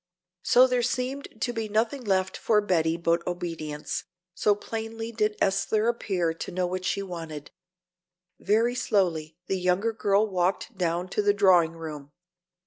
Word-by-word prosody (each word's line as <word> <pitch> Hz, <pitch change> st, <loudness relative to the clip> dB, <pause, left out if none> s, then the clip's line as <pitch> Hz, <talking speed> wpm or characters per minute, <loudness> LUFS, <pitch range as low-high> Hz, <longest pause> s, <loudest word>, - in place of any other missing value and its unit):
So 250 Hz, +7 st, +6 dB
there 250 Hz, -1 st, +1 dB
seemed 250 Hz, 0 st, -3 dB
to 240 Hz, -, 0 dB
be 225 Hz, -2 st, -3 dB
nothing 225 Hz, +5 st, 0 dB
left 190 Hz, -3 st, 0 dB
for 215 Hz, -2 st, +2 dB
Betty 165 Hz, -5 st, +1 dB
but 170 Hz, 0 st, +1 dB
obedience, 165 Hz, -4 st, -4 dB, 0.3 s
so 205 Hz, +3 st, +2 dB
plainly 225 Hz, +2 st, -5 dB
did 215 Hz, -2 st, 0 dB
Esther 205 Hz, +3 st, +1 dB
appear 190 Hz, -8 st, 0 dB
to 165 Hz, -, -6 dB
know 180 Hz, 0 st, 0 dB
what 185 Hz, +1 st, -3 dB
she 200 Hz, -, 0 dB
wanted. 165 Hz, -5 st, -7 dB, 0.9 s
Very 225 Hz, +4 st, +2 dB
slowly 165 Hz, -9 st, 0 dB
the 190 Hz, -, -1 dB
younger 185 Hz, +5 st, +1 dB
girl 205 Hz, -1 st, +2 dB
walked 185 Hz, +3 st, -1 dB
down 175 Hz, -1 st, -1 dB
to 210 Hz, -, 0 dB
the 205 Hz, 0 st, +3 dB
drawing 180 Hz, -5 st, +5 dB
room. 155 Hz, -4 st, -8 dB
195 Hz, 150 wpm, -27 LUFS, 170-220 Hz, 0.9 s, So